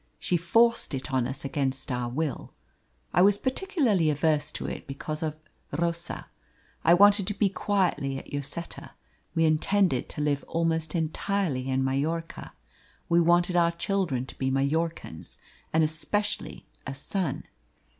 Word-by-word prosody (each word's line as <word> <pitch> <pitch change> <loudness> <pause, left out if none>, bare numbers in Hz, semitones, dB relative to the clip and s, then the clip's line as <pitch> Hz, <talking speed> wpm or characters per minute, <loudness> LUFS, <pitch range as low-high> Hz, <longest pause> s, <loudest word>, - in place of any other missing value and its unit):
She 180 - 0
forced 225 +1 +3
it 135 +1 -5
on 130 -2 +2
us 140 +2 -5
against 135 -1 -2
our 125 -1 -1
will. 140 0 -3 0.6
I 180 - +4
was 200 +2 +5
particularly 260 - +1
averse 150 0 +1
to - - -5
it - - -5
because 150 +3 -5
of 155 -1 -2 0.4
Rosa. 170 +1 -2 0.6
I 170 - +6
wanted 200 0 +6
to 205 - -1
be 200 -1 +2
quietly 180 -9 0
at 135 - -10
Lloseta. 145 +4 -5 0.4
We 165 0 +3
intended 160 -2 +2
to - - -4
live 145 -1 0
almost 165 -1 0
entirely 160 -4 -1
in 130 0 +1
Majorca. 155 +5 -2 0.6
We 170 0 +5
wanted 175 +1 +3
our 170 -1 +4
children 170 -7 -1
to - - -12
be 130 - 0
Majorcans, 140 - -2 0.3
and 160 0 +3
especially 205 +7 -2 0.2
a 135 - -4
son. 180 +6 -3
160 Hz, 145 wpm, -27 LUFS, 140-180 Hz, 0.6 s, I